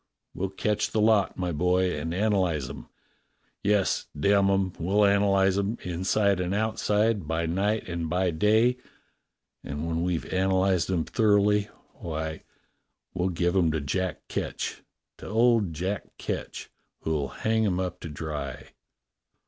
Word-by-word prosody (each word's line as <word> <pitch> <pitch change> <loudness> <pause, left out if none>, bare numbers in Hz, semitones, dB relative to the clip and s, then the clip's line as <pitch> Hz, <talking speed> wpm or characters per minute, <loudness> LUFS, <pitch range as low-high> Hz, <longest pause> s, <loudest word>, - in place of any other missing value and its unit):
We'll 95 +1 -2
catch 105 +2 -1
the 110 - -1
lot, 105 -2 +3
my 90 -1 -1
boy, 90 +3 +1
and 75 +2 -3
analyze 90 -7 +1
'em. - - -9 0.7
Yes, 100 -1 +1
damn 100 +4 +4
'em! 95 -2 +1
we'll 100 +5 +3
ana 100 0 +3
lyze 95 0 +3
'em, 100 +4 -1
inside 95 +3 +1
and 90 +2 -1
outside, 110 -3 +1
by 80 +1 -1
night 100 +6 0
and 85 -2 -3
by 90 +1 +1
day. 110 +9 +3 0.9
And 75 +3 -4
when 85 0 -1
we've 90 -1 -1
analyzed 95 -1 +2
'em 90 -4 +1
thoroughly, 105 0 +2 0.2
why, 80 -1 -5 0.7
we'll 90 +1 0
give 85 +1 0
'em 90 -4 +4
to 80 - 0
Jack 90 +5 -3
Ketch - - -4 0.2
— - - -60
to - - -9
old 115 -2 +3
Jack 95 +6 -4
Ketch, - - -5 0.3
who'll 75 -3 -1
hang 110 +7 0
'em 90 -2 0
up 90 -1 -3
to 85 - -7
dry. 75 -3 -5
95 Hz, 150 wpm, -27 LUFS, 85-105 Hz, 0.9 s, damn